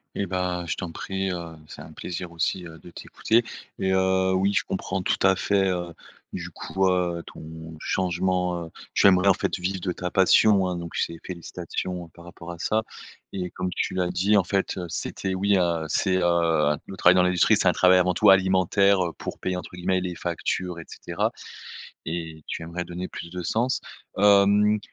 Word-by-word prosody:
Et 100 - -1
bah 90 -1 -2
je - - -1
t'en 90 -3 -5
prie, 95 +2 -3
heu, 85 -2 -6
c'est - - -10
un - - -11
plaisir 90 -1 -6
aussi, 85 +2 -1
heu, 80 0 -12
de 90 - -14
t'écouter 115 +7 0 0.3
et 95 0 +1
heu, 95 0 +2
oui, 95 +2 +2
je - - +1
comprends 95 0 -3
tout 95 - 0
à 95 -1 +5
fait, 95 -2 +2
heu, 85 -2 -3 0.4
du - - -5
coup, 95 0 -1
heu, 90 -2 0
ton 80 0 -10
changement, 90 -1 -1
heu, - - -11 0.2
tu - - +5
aimerais 95 +1 +5
en - - +7
fait - - -2
vivre 95 +1 -2
de 90 0 -2
ta 90 -1 -4
passion 95 0 +5
hein. 90 - -2
Donc 85 -1 -6
c'est 85 - -1
félicitations 90 0 -5
par 85 +1 -16
rapport 85 0 -9
à 85 - -9
ça 110 +4 0 0.5
et 90 -2 -4
comme 95 0 -3
tu - - -2
l'as 90 -1 0
dit 100 +4 +2
en 100 - +5
fait, 95 +2 -1
heu, 90 - -3
c'était 95 +3 -3
oui, 100 +2 +2
heu, 85 -3 +1
c'est, 95 +4 +1
heu, 85 -4 +2
le 95 - -8
travail 90 +1 +6
dans 90 - +5
l'industrie 90 -1 +4
c'est - - +3
un - - +5
travail 90 0 +5
avant 90 0 +2
tout 105 +3 +4
alimentaire, 95 +1 +4
heu, 85 - -6
pour - - -6
payer 90 0 -2
entre 90 - -6
guillemets 90 +1 0
«les 90 -1 -4
factures» 90 +1 -3
et - - -10
cetera - - -2 0.7
et 80 -2 -5
tu - - -5
aimerais 85 +2 -5
donner 90 +1 -6
plus 85 - -8
de 90 0 -5
sens. 115 +8 0 0.4
Hem, 105 +1 +5
90 Hz, 200 wpm, -25 LUFS, 85-95 Hz, 0.7 s, en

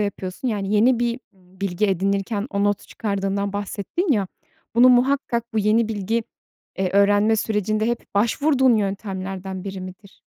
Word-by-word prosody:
yapıyorsun? 200 +4 -3
Yani, 205 -2 -1
yeni 235 +4 +4
bir, 240 0 -1
ımm, 185 0 -24
bilgi 200 +1 0
edinirken 195 +2 -1
o 200 -1 0
notu 205 -1 0
çıkardığından 200 -1 -2
bahsettin 205 - -2
ya, 205 -4 +1 0.5
bunu 245 +2 +7
muhakkak 250 -1 +2
bu - - +2
yeni 215 +2 +2
bilgi, 220 +2 -1 0.6
eee, 190 -1 0
öğrenme 205 +2 +4
sürecinde 215 0 0
hep 240 -2 -4
başvurduğun 260 +4 +3
yöntemlerden 195 -2 -4
biri 195 -1 -5
midir? 185 +2 -11
205 Hz, 145 wpm, -22 LUFS, 195-230 Hz, 0.6 s, bunu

